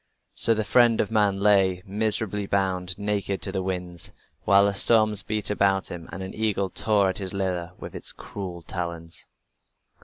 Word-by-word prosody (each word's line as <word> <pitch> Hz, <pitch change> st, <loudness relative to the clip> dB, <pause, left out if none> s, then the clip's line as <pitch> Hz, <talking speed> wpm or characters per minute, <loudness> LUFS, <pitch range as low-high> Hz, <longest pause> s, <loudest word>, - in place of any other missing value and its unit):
So 115 Hz, -, +3 dB
the 110 Hz, -, -1 dB
friend 115 Hz, +2 st, +4 dB
of 105 Hz, -, 0 dB
man 105 Hz, -3 st, +2 dB
lay, 95 Hz, -3 st, +3 dB
miserably 105 Hz, 0 st, -1 dB
bound, 95 Hz, -2 st, -1 dB
naked 100 Hz, -1 st, -2 dB
to 95 Hz, -, -2 dB
the 95 Hz, -1 st, -2 dB
winds, 90 Hz, -2 st, -5 dB, 0.3 s
while 100 Hz, +2 st, +6 dB
the 100 Hz, -, +1 dB
storms 110 Hz, 0 st, +4 dB
beat 105 Hz, +1 st, -2 dB
about 95 Hz, -1 st, +1 dB
him 85 Hz, -2 st, -8 dB
and 95 Hz, -, -6 dB
an 95 Hz, -, -7 dB
eagle 100 Hz, -3 st, -1 dB
tore 105 Hz, -3 st, +2 dB
at 95 Hz, -, -1 dB
his 95 Hz, -1 st, -3 dB
liver 90 Hz, -3 st, -2 dB
with -, -, -9 dB
its -, -, -4 dB
cruel 90 Hz, -4 st, -8 dB
talons. 85 Hz, -2 st, -6 dB
100 Hz, 175 wpm, -25 LUFS, 90-105 Hz, 0.3 s, while